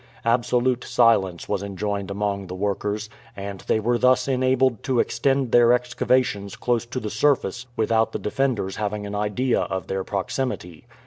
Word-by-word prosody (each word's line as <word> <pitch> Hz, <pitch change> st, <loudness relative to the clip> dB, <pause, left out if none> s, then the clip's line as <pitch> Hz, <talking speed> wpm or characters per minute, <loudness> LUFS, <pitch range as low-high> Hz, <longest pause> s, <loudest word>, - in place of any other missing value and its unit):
Absolute 125 Hz, +1 st, +1 dB
silence 95 Hz, -7 st, +2 dB
was 100 Hz, -, -1 dB
enjoined 100 Hz, 0 st, -3 dB
among 100 Hz, -1 st, -2 dB
the 90 Hz, -, -6 dB
workers, 105 Hz, +2 st, -2 dB, 0.3 s
and 100 Hz, -1 st, -6 dB
they -, -, +2 dB
were 120 Hz, +2 st, +1 dB
thus 125 Hz, +1 st, +3 dB
enabled 130 Hz, -2 st, +2 dB
to 130 Hz, -3 st, 0 dB
extend 135 Hz, +1 st, +1 dB
their 120 Hz, 0 st, +6 dB
excavations 125 Hz, -3 st, 0 dB
close 120 Hz, -1 st, -1 dB
to 130 Hz, -, -4 dB
the 105 Hz, -3 st, -5 dB
surface 125 Hz, -1 st, +1 dB
without 110 Hz, 0 st, +2 dB
the -, -, -3 dB
defenders 110 Hz, -4 st, -1 dB
having 105 Hz, 0 st, -3 dB
an 100 Hz, -, -6 dB
idea 105 Hz, +5 st, 0 dB
of 95 Hz, -1 st, -3 dB
their 95 Hz, 0 st, -2 dB
proximity. 95 Hz, -, -4 dB
110 Hz, 155 wpm, -23 LUFS, 100-125 Hz, 0.3 s, their